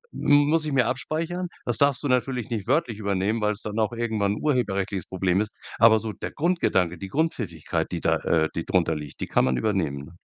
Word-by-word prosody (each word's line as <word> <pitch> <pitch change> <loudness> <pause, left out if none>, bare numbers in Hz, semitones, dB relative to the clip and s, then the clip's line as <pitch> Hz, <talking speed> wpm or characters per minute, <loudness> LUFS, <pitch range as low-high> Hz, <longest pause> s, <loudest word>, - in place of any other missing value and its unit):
m 145 0 +4
muss 160 0 +2
ich 150 - -2
mir 130 -3 +3
abspeichern.“ 160 +8 -2 0.2
Das - - +4
darfst 140 -2 +3
du - - 0
natürlich 125 -2 0
nicht 110 -3 -3
wörtlich 125 -6 +1
übernehmen, 100 +2 0
weil's 105 0 0
dann 105 +1 -3
auch 110 +1 +1
irgendwann 110 -4 0
'n 105 - -6
urheberrechtliches 100 - -1
Problem 95 0 0
ist, 105 - -2 0.3
aber 115 -1 +7
so 110 0 -4
der - - -6
Grundgedanke, 145 - +1
die 100 - -6
Grundpfiffigkeit, 110 - -2
die - - -1
da, - - +2
äh 80 -1 +1
die 85 - -2
drunter 85 -3 +1
liegt, 75 -3 -7
die - - -2
kann - - +2
man 65 0 +1
übernehmen, 75 - -1
ne? 80 - -15
110 Hz, 215 wpm, -25 LUFS, 95-130 Hz, 0.3 s, aber